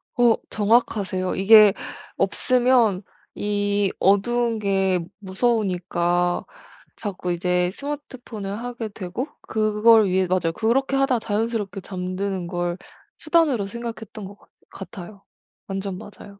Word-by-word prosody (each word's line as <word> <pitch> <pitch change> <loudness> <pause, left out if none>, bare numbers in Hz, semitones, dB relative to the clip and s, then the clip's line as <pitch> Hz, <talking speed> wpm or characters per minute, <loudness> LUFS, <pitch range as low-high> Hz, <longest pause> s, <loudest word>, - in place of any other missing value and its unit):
어 240 -3 +5
정확하세요. 205 -4 +1
이게 210 +1 +7 0.4
없으면 245 -6 +2 0.3
이 205 -1 0
어두운 230 +4 +2
게 195 -2 +1 0.2
무서우니까 180 -4 0 0.5
자꾸 185 -4 -4
이제 180 +1 +1
스마트폰을 255 -7 -6
하게 240 -1 -5
되고 200 - -5
그걸 215 0 +4
위해 185 +1 +2
맞아요. 175 -3 0
그렇게 265 +5 +1
하다 270 -3 +2
자연스럽게 210 -3 -2
잠드는 185 0 -4
걸 175 0 -2 0.4
수단으로 310 - +2
생각했던 225 -1 -7
것 200 +1 -11
같 - - -25 0.4
같아요. 195 +2 -10 0.4
완전 195 -1 -4
맞아요. 200 0 -12
205 Hz, 265 characters per minute, -23 LUFS, 185-230 Hz, 0.5 s, 이게